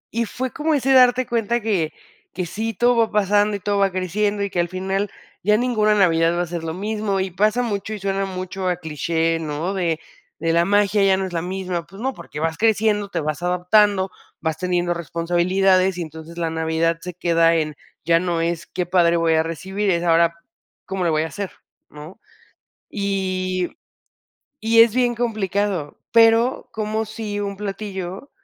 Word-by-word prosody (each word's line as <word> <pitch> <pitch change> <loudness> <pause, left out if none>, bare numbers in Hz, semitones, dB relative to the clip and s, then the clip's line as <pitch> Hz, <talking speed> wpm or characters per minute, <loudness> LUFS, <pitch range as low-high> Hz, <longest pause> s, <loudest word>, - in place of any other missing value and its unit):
Y 235 0 +1
fue 255 +3 -4
como 310 +4 0
ese 270 -1 +2
darte 255 0 +5
cuenta 235 -1 0
que 200 -8 0 0.4
que 180 - -2
sí, 220 +6 -3
todo 240 +4 +3
va 225 -1 +2
pasando 205 0 +2
y - - -4
todo 205 +1 -1
va 195 -1 +3
creciendo, 205 +3 -1
y 200 - -2
que 180 - -3
al 175 - +2
final, 190 +2 -2 0.3
ya 210 +2 +4
ninguna 220 -3 +2
Navidad 165 -4 +3
va 175 - 0
a 175 - -2
ser 170 0 -5
lo 160 0 -3
mismo. 210 +1 -2
Y 190 0 -1
pasa 215 +6 +2
mucho 215 -2 -3
y 210 - -5
suena 195 0 -1
mucho 185 0 -4
a 180 - 0
cliché, 165 +1 -1
¿no?, 160 +4 -3
de 170 -4 -1 0.4
de 165 +1 0
la 170 +1 +3
magia, 205 +1 +3
ya 195 -1 +5
no 190 - -1
es 185 - -6
la 165 - -1
misma. 180 -2 -3
Pues 195 +4 -12
no, 265 +2 -1
porque 150 - -9
vas 160 +1 -1
creciendo, 215 -1 +2
te 170 -4 -2
vas 155 +2 -3
adaptando, 190 +2 +3 0.3
vas 160 -1 -1
teniendo 175 0 0
responsabilidades, 180 +3 +1
y - - -3
entonces 160 +1 -10
la 165 -1 0
Navidad 160 +1 0
se 180 +1 -6
queda 165 -1 +3
en 155 -2 -1 0.3
ya 165 0 +4
no 170 -2 -1
es, 170 0 -2
¡qué 180 0 -3
padre 170 -2 +3
voy 165 -1 +2
a 160 0 +3
recibir!, 190 +5 -3
es 170 -1 0
ahora, 170 0 +4 0.5
¿cómo 190 -1 -3
le - - +2
voy 155 0 +1
a - - -2
hacer, 195 +5 -5 0.4
no? 150 +8 -11 0.7
Y 185 - -2 0.8
y 225 +1 +4
es 230 -1 +6
bien 245 -1 +2
complicado. 205 -7 -2
Pero, 230 +2 +4
como 220 0 -2
sí 210 -1 -5
un 200 -1 -3
platillo, 195 +2 -5
190 Hz, 190 wpm, -21 LUFS, 170-210 Hz, 0.8 s, es